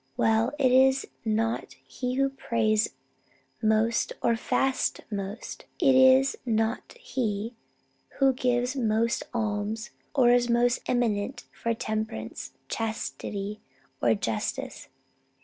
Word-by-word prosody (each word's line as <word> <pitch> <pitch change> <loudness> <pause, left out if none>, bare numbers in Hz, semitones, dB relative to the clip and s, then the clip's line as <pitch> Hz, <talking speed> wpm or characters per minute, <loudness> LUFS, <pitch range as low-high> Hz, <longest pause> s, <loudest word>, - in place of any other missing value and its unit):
Well, 225 +1 +3
it 265 -3 +3
is 265 +1 +5 0.2
not 225 +1 -1
he 250 -1 -3
who 275 +1 +2
prays 220 -5 +1 0.7
most 220 +1 +2
or 235 - +3
fasts 265 +3 0
most; 200 +1 -5
it 275 -6 +5
is 260 +1 +6
not 225 -1 -1
he 230 - -2 0.6
who 270 -1 +4
gives 250 +1 0
most 230 -2 +1
alms 220 0 -2 0.2
or 245 -4 +5
is 245 0 +3
most 240 +1 +3
eminent 235 -1 0
for 230 0 -2
temperance, 215 - -4
chastity, 210 - -4 0.4
or 115 -2 +4
justice. 110 +2 -3
230 Hz, 110 wpm, -27 LUFS, 215-255 Hz, 0.7 s, is